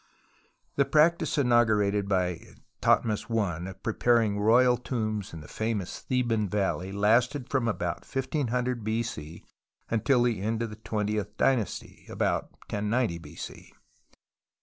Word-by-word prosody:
The 140 Hz, -, +4 dB
practice 160 Hz, +2 st, +3 dB
inaugurated 105 Hz, -6 st, +3 dB
by 90 Hz, -3 st, 0 dB, 0.4 s
Thothmes 110 Hz, -3 st, +2 dB
I 95 Hz, -6 st, -1 dB
of 95 Hz, -, -12 dB
preparing 110 Hz, -2 st, +2 dB
royal 125 Hz, +4 st, +5 dB
tombs 110 Hz, -4 st, -3 dB
in 80 Hz, -, -8 dB
the 75 Hz, -, -11 dB
famous 110 Hz, -4 st, -3 dB
Theban 115 Hz, -5 st, 0 dB
Valley 95 Hz, -1 st, -1 dB
lasted 120 Hz, +6 st, +2 dB
from 130 Hz, -4 st, +1 dB
about 90 Hz, -6 st, -1 dB
1500 125 Hz, -3 st, -2 dB
b.c. 110 Hz, -8 st, -4 dB, 0.5 s
until 115 Hz, +3 st, +3 dB
the 115 Hz, -5 st, 0 dB
end 110 Hz, +2 st, -1 dB
of 115 Hz, -, -4 dB
the -, -, -7 dB
twentieth 105 Hz, -2 st, -2 dB
dynasty, 120 Hz, -8 st, -1 dB
about -, -, -1 dB, 0.2 s
1090 105 Hz, -3 st, 0 dB
b.c. 85 Hz, -, -10 dB
110 Hz, 125 wpm, -28 LUFS, 100-125 Hz, 0.5 s, royal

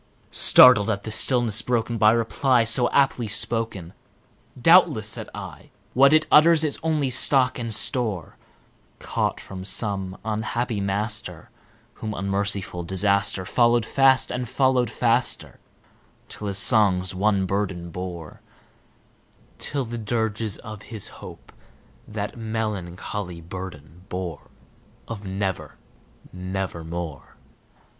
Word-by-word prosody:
Startled 125 Hz, -5 st, +8 dB
at 100 Hz, -2 st, -2 dB
the 110 Hz, -, -6 dB
stillness 115 Hz, -1 st, +2 dB
broken 120 Hz, -1 st, -2 dB
by 105 Hz, 0 st, +5 dB
reply 115 Hz, +2 st, +1 dB
so 120 Hz, +2 st, +2 dB
aptly 135 Hz, -4 st, +1 dB
spoken, 105 Hz, -4 st, -2 dB, 0.7 s
"Doubtless," 155 Hz, -, +4 dB
said -, -, -4 dB
I, -, -, -10 dB, 0.2 s
"what 135 Hz, +2 st, +5 dB
it 155 Hz, 0 st, +4 dB
utters 160 Hz, +1 st, +6 dB
is 150 Hz, -3 st, 0 dB
its -, -, -20 dB
only 155 Hz, -5 st, 0 dB
stock 130 Hz, 0 st, +2 dB
and 115 Hz, -1 st, -5 dB
store, 110 Hz, -, -1 dB, 0.6 s
Caught -, -, -3 dB
from 95 Hz, -1 st, -9 dB
some 95 Hz, -2 st, -1 dB
unhappy 110 Hz, 0 st, -3 dB
master 105 Hz, +3 st, -4 dB, 0.4 s
whom 110 Hz, -1 st, -6 dB
unmerciful 100 Hz, -2 st, -2 dB
Disaster 95 Hz, +1 st, +1 dB
Followed 120 Hz, +1 st, +2 dB
fast 135 Hz, 0 st, +3 dB
and 125 Hz, -1 st, -4 dB
followed 130 Hz, -3 st, +1 dB
faster 120 Hz, +1 st, -1 dB, 0.7 s
till 105 Hz, -, -7 dB
his 100 Hz, -1 st, 0 dB
songs 100 Hz, -3 st, +2 dB
one 100 Hz, 0 st, 0 dB
burden 95 Hz, -3 st, -3 dB
bore 85 Hz, -3 st, -8 dB, 1.2 s
Till 140 Hz, -3 st, -3 dB
the 120 Hz, 0 st, -6 dB
dirges 110 Hz, -1 st, -2 dB
of 105 Hz, -1 st, -10 dB
his 110 Hz, -3 st, -6 dB
Hope -, -, -13 dB, 0.6 s
that 105 Hz, -1 st, -5 dB
melancholy 105 Hz, -5 st, -5 dB
burden 85 Hz, -1 st, -10 dB
bore 90 Hz, -4 st, -6 dB, 0.6 s
Of 105 Hz, -3 st, -8 dB
'Never 95 Hz, 0 st, -4 dB, 0.6 s
nevermore.'" 85 Hz, -5 st, -6 dB
105 Hz, 115 wpm, -23 LUFS, 95-120 Hz, 1.2 s, Startled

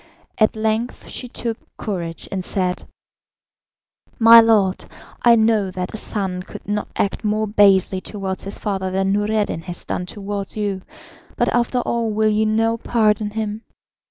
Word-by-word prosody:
At 215 Hz, 0 st, +3 dB
length 220 Hz, +2 st, -2 dB
she 250 Hz, -, -6 dB
took 235 Hz, -1 st, -4 dB, 0.2 s
courage 170 Hz, -6 st, -4 dB
and 190 Hz, -1 st, -3 dB
said: 180 Hz, -1 st, -2 dB, 1.3 s
"My 230 Hz, 0 st, +9 dB
lord, 210 Hz, -5 st, +2 dB, 0.4 s
I 235 Hz, -1 st, +6 dB
know 220 Hz, -3 st, +2 dB
that 185 Hz, -1 st, -5 dB
a -, -, -4 dB
son 190 Hz, -4 st, -1 dB
could 185 Hz, -, -11 dB
not 210 Hz, 0 st, -2 dB
act 200 Hz, -, -1 dB
more 215 Hz, 0 st, 0 dB
basely 195 Hz, -3 st, +3 dB
towards 195 Hz, -2 st, -5 dB
his 195 Hz, -, -5 dB
father 195 Hz, -2 st, -2 dB
than 195 Hz, +1 st, 0 dB
Noureddin 205 Hz, -4 st, 0 dB
has 175 Hz, -1 st, -6 dB
done 180 Hz, -, -3 dB
towards 200 Hz, +1 st, -5 dB
you, 200 Hz, -3 st, -2 dB, 0.6 s
but -, -, +2 dB
after 245 Hz, +1 st, +1 dB
all 235 Hz, -2 st, -1 dB
will 215 Hz, 0 st, +2 dB
you 215 Hz, +1 st, +2 dB
now 225 Hz, +1 st, +1 dB
pardon 215 Hz, -2 st, +1 dB
him? 215 Hz, 0 st, -4 dB
210 Hz, 155 wpm, -20 LUFS, 195-220 Hz, 1.3 s, My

